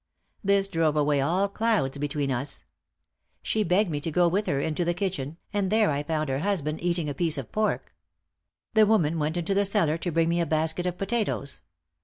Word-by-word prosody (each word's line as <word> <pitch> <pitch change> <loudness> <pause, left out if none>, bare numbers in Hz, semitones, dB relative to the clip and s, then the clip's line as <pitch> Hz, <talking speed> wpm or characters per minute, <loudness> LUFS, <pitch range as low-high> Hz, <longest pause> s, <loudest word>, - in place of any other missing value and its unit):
This 200 0 +4
drove 165 -5 +1
away 145 -1 +2
all 180 +8 +1
clouds 200 -10 0
between 145 -1 -1
us. 130 +3 -2 0.8
She 220 - 0
begged 190 0 +2
me 145 - -1
to 155 - -3
go 175 +2 +3
with 195 +5 0
her 140 - +1
into 160 +4 -1
the 175 0 0
kitchen, 165 -6 -3 0.2
and 200 -2 0
there 215 -4 +3
I 140 0 -1
found 155 0 -2
her 135 0 -1
husband 160 -4 -1
eating 170 -2 0
a 145 - -2
piece 160 +1 0
of 135 -5 -6
pork. 215 -1 -1 0.8
The 220 -1 +5
woman 170 -7 +2
went 155 +3 -1
into 175 +3 -1
the 200 +1 +3
cellar 180 -6 +1
to 175 - -2
bring 165 0 +2
me 170 +1 +1
a 170 - -1
basket 160 +3 0
of 180 0 -3
potatoes. 195 - -2
170 Hz, 205 wpm, -26 LUFS, 150-195 Hz, 0.8 s, The